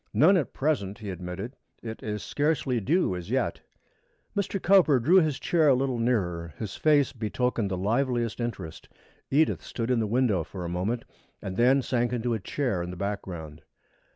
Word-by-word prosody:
"None 180 +7 +6
at 165 -7 0
present," 120 -10 -1
he 105 -3 -6
admitted. 90 +7 -6 0.3
"It 110 -1 -6
is 105 -3 -4
scarcely 145 - 0
due 135 - +1
as 90 +1 -7
yet." 130 +3 -1 0.7
Mr. 200 -1 -1
Cowper 175 -8 +5
drew 160 +11 +5
his 155 -6 +3
chair 165 -3 +2
a 135 - +6
little 130 -2 -1
nearer. 90 -9 -1
His 110 - -5
face 145 -4 +3
betokened 115 -1 -1
the 95 - -2
liveliest 120 +3 0
interest. 100 -9 -5 0.4
Edith 150 +3 +2
stood 115 +1 -3
in 125 - +2
the 110 - 0
window 110 -6 +2
for 90 +2 -7
a - - -3
moment 100 +7 -2 0.3
and 95 -1 -5
then 130 +4 +4
sank 120 -1 0
into 120 0 -1
a 110 - -1
chair 120 -3 -2
in 85 - -4
the 90 - -7
background. 85 -6 -5
120 Hz, 180 wpm, -27 LUFS, 95-135 Hz, 0.7 s, None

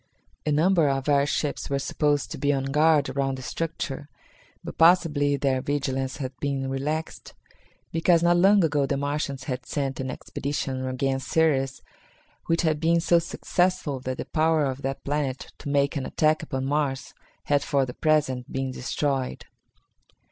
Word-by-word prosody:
A - - +2
number 165 0 +3
of 135 0 -1
air 140 -1 +3
ships 150 -1 -2
were 140 - +1
supposed 145 +1 0
to - - -6
be 145 +1 +2
on 135 -2 0
guard 150 0 +4
around 135 0 -1
the 130 - -8
structure, 150 -2 -4 0.5
but - - -8
possibly 155 -4 +4
their 135 -1 +1
vigilance 135 -2 -2
had 130 -2 -5
been 135 -2 -2
relaxed, 150 +4 -4 0.6
because 165 +1 +3
not 175 0 +4
long 195 +2 +5
ago 145 -3 +1
the 140 - 0
Martians 140 -1 -2
had 125 -2 -4
sent 135 -1 -2
an 130 0 -3
expedition 135 -2 -3
against 135 +1 -1
Ceres 135 -5 +1 0.6
which 165 +1 +1
had 155 -2 +1
been 170 +1 +3
so 170 +1 +4
successful 175 -3 -1
that 130 0 -4
the - - -4
power 160 -1 +2
of 135 0 -3
that 135 0 -4
planet 140 -2 -2
to - - -6
make 140 0 +1
an 135 -3 -2
attack 155 0 +2
upon 130 -4 -3
Mars 140 -1 -1 0.3
had 145 -1 +2
for 140 -1 +1
the 125 - -7
present 140 -5 0
been 135 0 -2
destroyed. 135 +1 -2
145 Hz, 165 wpm, -25 LUFS, 135-155 Hz, 0.6 s, long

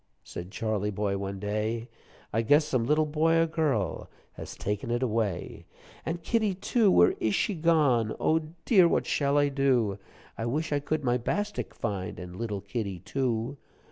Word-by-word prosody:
Said 90 +1 -7
Charley 105 -1 -1
boy 100 -1 -1
one 100 0 -4
day; 110 +3 -2 0.5
"I 115 - +2
guess 145 +7 +4
some 130 -6 0
little 155 +2 +3
boy 155 +2 +2
or 165 - +4
girl 150 - -1 0.2
Has - - -9
taken 105 +2 -3
it 120 +2 0
away. 110 -7 -2 0.4
"An' 165 - -1
kittie, 215 -1 +1
too 205 +3 +2
where 90 - +5
ish 110 -2 +1
she 210 - +1
gone? 150 - +2
Oh, 160 - +3 0.3
dear, 190 -7 +6
what - - +1
I - - -10
shall 145 0 +2
do? 125 -8 +1 0.4
I 115 - -1
wish 150 +5 -1
I 145 - +2
could 150 +1 -2
my 125 -1 +1
bastik 205 - -3
find, 100 -5 -4
An' 90 -1 -8
little 105 -4 -3
kittie, 100 -1 -4
too. 120 - -2
120 Hz, 175 wpm, -28 LUFS, 105-155 Hz, 0.5 s, dear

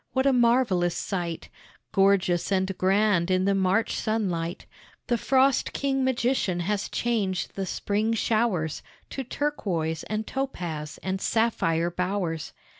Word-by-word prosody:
What 260 0 +1
a 275 - +4
marvelous 235 -8 +3
sight, 175 -4 -3 0.4
Gorgeous 195 -3 +2
and 190 0 +1
grand 190 -2 +2
in 185 0 +2
the 200 - +3
March 195 +3 +1
sunlight! 180 -6 -2 0.4
The 240 - +1
frost 265 +2 +2
king 270 -1 0
magician 245 -8 +1
has 200 +3 -1
changed 205 -6 -1
the 195 -1 -3
spring 215 +4 0
showers 215 -9 0 0.3
To 270 - -4
turquois 190 - -2
and 215 0 -2
topaz 175 - -4
and 190 0 -2
sapphire 175 -7 +1
bowers. 180 -3 -2
195 Hz, 125 wpm, -26 LUFS, 175-235 Hz, 0.4 s, a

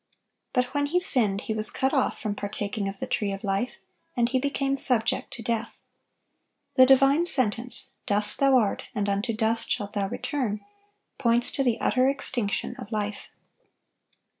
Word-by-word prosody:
But 250 0 -1
when 285 0 0
he 350 +5 +1
sinned, 220 - +2
he 220 - -3
was 215 -1 0
cut 265 0 -1
off 265 -3 0
from 215 -3 -3
partaking 205 0 -4
of 195 0 -5
the - - -3
tree 205 -2 -1
of 195 0 -6
life, 200 +5 -2 0.4
and 235 0 +2
he 260 0 +1
became 275 0 -1
subject 250 -4 +5
to 230 - -8
death. 230 0 -3 1.0
The 260 -1 +6
divine 275 +5 +4
sentence, 245 -4 0 0.2
"Dust 210 0 0
thou 275 -1 +5
art, 215 -5 0
and 205 -1 -1
unto 200 +4 -1
dust 225 +1 0
shalt 205 -4 -2
thou 200 -1 -1
return," 220 -3 -3 0.6
points 240 -2 +2
to 275 - -1
the 245 -4 0
utter 255 +1 +2
extinction 250 -6 -2
of 205 - -10
life. 210 -1 -4
235 Hz, 165 wpm, -26 LUFS, 205-265 Hz, 1.0 s, The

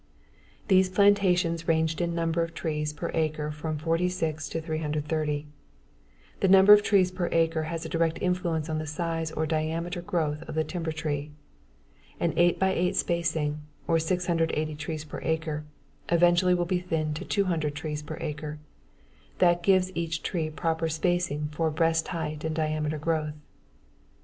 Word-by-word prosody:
These 190 -2 +5
plantations 185 -4 +3
ranged 160 0 +1
in 170 -1 -1
number 165 0 0
of 165 0 -3
trees 150 -2 -2
per 150 +3 -5
acre 155 -2 -1
from 155 +1 -4
46 165 -1 -1
to 165 - -2
330. 155 -1 -2 0.9
The 195 - +2
number 195 +2 +8
of 210 - +7
trees 190 -3 +3
per 180 -1 -2
acre 165 -1 +2
has 165 -1 -4
a - - -5
direct 165 0 +1
influence 175 -4 -1
on 155 -1 -2
the 155 - -4
size 165 +1 -2
or 160 0 -1
diameter 165 +3 -2
growth 155 -4 -1
of - - -5
the 160 - +2
timber 165 -1 -3
tree. 150 -2 -3 0.9
An 170 - +1
eight 175 0 +4
by 190 0 +2
eight 180 0 0
spacing, 160 -3 0 0.3
or 165 -1 +3
680 165 -2 0
trees 155 +1 -5
per 150 - -7
acre, 160 -2 -2 0.4
eventually 175 +1 +4
will 175 0 0
be 180 +1 0
thinned 160 -4 -2
to - - -5
200 165 -7 0
trees 150 0 -4
per 155 +1 -7
acre. 150 -1 -4 0.8
That 175 -1 +4
gives 185 0 +3
each 165 -1 -2
tree 160 -3 -1
proper 160 +1 -1
spacing 160 -2 0
for 160 +2 0
best 165 +1 +1
height 155 -3 -4
and 160 0 -2
diameter 155 -1 -1
growth. 155 -1 -1
165 Hz, 160 wpm, -27 LUFS, 155-175 Hz, 0.9 s, number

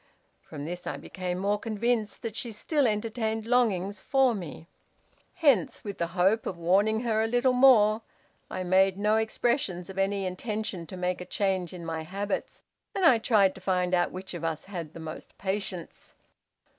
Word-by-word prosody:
From 145 -1 -8
this 175 +2 -5
I - - -3
became 180 -1 -4
more 200 +2 0
convinced 225 0 -1
that 225 -2 -4
she 235 +1 -3
still 275 +6 +1
entertained 220 0 -1
longings 205 -5 +1
for 270 -3 +3
me. 170 -6 -7 0.7
Hence, 280 - +2
with 200 -2 -6
the 170 - 0
hope 195 +5 +3
of 180 - -4
warning 200 +6 +2
her 225 -3 +1
a 220 - +1
little 245 +2 +2
more, 230 -4 +6 0.5
I 185 - -3
made 190 +1 +3
no 210 +2 +2
expressions 220 -5 -1
of 190 - -6
any 195 0 0
intention 185 -2 -4
to 185 - -8
make 180 0 -1
a - - -6
change 190 -3 -1
in 175 -2 -8
my 165 -1 -3
habits, 195 +5 -4 0.3
and 385 - +2
I 250 -8 +7
tried 205 -5 +4
to 190 - -13
find 180 -1 0
out 175 -1 +2
which 185 +1 -7
of 170 -2 -6
us 160 -1 -2
had 170 -5 -6
the - - -7
most 160 -1 -8
patience. 190 -3 -4
200 Hz, 180 wpm, -28 LUFS, 180-220 Hz, 0.7 s, I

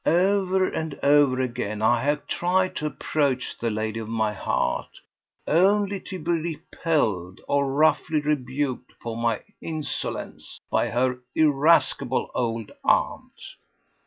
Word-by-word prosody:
Over 190 +2 +3
and 160 -3 -4
over 140 -2 +5
again 120 -4 -2
have 120 +6 +2
I - - -34
tried 185 +1 +1
to 150 - -1
approach 140 -4 -1
the 115 - 0
lady 110 +1 -2
of 110 -1 -6
my 110 -2 0
heart, 100 - -2 0.5
only 200 +4 +3
to 185 - -7
be 170 0 -2
repelled 155 - -1
or 140 -1 +1
roughly 155 +1 +3
rebuked 135 -3 -2
for 115 -1 -5
my 115 -2 0 0.2
insolence 155 -2 -4
by - - +2
her 125 +1 0 0.2
irascible 145 -3 +3
old 115 -3 -2
aunt." - - 0
140 Hz, 125 wpm, -25 LUFS, 120-160 Hz, 0.5 s, over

